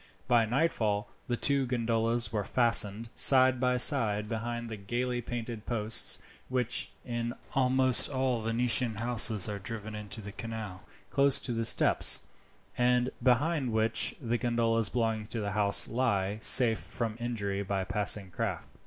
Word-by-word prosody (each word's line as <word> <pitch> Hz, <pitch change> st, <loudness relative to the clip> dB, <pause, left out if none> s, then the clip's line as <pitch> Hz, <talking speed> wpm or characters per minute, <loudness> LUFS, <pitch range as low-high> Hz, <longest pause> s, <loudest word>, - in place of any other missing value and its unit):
By 120 Hz, -3 st, +2 dB
nightfall 110 Hz, -6 st, -2 dB, 0.2 s
the 120 Hz, -, -3 dB
two 140 Hz, 0 st, +3 dB
gondolas 115 Hz, -1 st, 0 dB
were 105 Hz, -2 st, -2 dB
fastened, 115 Hz, -1 st, +2 dB
side 130 Hz, -1 st, +4 dB
by 125 Hz, 0 st, 0 dB
side, 110 Hz, -6 st, +4 dB
behind 120 Hz, +1 st, -5 dB
the 110 Hz, -, -7 dB
gaily 120 Hz, +4 st, -4 dB
painted 115 Hz, -2 st, -8 dB
posts 110 Hz, -2 st, +3 dB, 0.3 s
which, 125 Hz, -1 st, 0 dB, 0.2 s
in 120 Hz, 0 st, -5 dB, 0.2 s
almost 130 Hz, -2 st, +4 dB
all 130 Hz, -4 st, -2 dB
Venetian 115 Hz, +1 st, 0 dB
houses, 110 Hz, -3 st, +2 dB
are 105 Hz, -1 st, -6 dB
driven 110 Hz, +1 st, -8 dB
into 105 Hz, 0 st, -8 dB
the 100 Hz, -1 st, -9 dB
canal 110 Hz, -4 st, -8 dB, 0.3 s
close 140 Hz, -1 st, +3 dB
to 120 Hz, -, -3 dB
the 115 Hz, 0 st, -3 dB
steps, -, -, +3 dB, 0.5 s
and 125 Hz, +1 st, 0 dB
behind 130 Hz, 0 st, 0 dB
which 110 Hz, 0 st, -1 dB
the 120 Hz, -3 st, -3 dB
gondolas 115 Hz, -3 st, 0 dB
belonging 110 Hz, -2 st, -3 dB
to 115 Hz, -, -6 dB
the 100 Hz, -1 st, -4 dB
house 100 Hz, 0 st, +2 dB
lie 105 Hz, -4 st, -2 dB
safe 115 Hz, -2 st, +7 dB
from 115 Hz, -2 st, -6 dB
injury 100 Hz, -5 st, -4 dB
by 95 Hz, -1 st, -3 dB
passing 100 Hz, 0 st, -1 dB
craft. 85 Hz, -, -5 dB
115 Hz, 145 wpm, -28 LUFS, 105-125 Hz, 0.5 s, safe